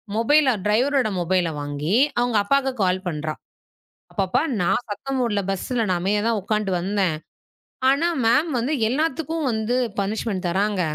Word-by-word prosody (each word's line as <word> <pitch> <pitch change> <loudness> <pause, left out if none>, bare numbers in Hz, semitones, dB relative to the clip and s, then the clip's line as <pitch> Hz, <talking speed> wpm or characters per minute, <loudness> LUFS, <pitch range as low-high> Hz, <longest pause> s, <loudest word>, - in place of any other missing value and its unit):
மொபைலில் 255 -1 +3
ட்ரைவரோட 250 +4 +2
மொபைலில் 175 -3 0
வாங்கி, 145 +6 -2 0.2
அவங்க 245 -1 0
அப்பாவுக்கு 270 +4 +1
கால் 185 0 +1
பண்ணுகிறா 155 -2 -3 0.8
"அப்பா, 195 - 0
அப்பா, 180 - +1 0.2
நான் 210 +7 +1
சத்தம் 265 +6 -3
போடவில்லை. 210 -5 0
பஸ்ஸில் 235 +6 -3
நான் 185 -4 0
அமைதியாக 205 +4 0
தான் 230 -2 +1
உட்கார்ந்து 210 0 -1
வந்தேன். 190 -2 0 0.7
ஆனா 285 +5 +2 0.2
மேம் 270 +9 +3
வந்து 260 +7 -1 0.2
எல்லாத்துக்கும் 315 +2 -1
வந்து 220 +2 -1 0.2
பனிஷ்மென்ட் 200 -1 -2
தருகிறாங்க. 195 +2 0
215 Hz, 145 wpm, -23 LUFS, 185-255 Hz, 0.8 s, மொபைலில்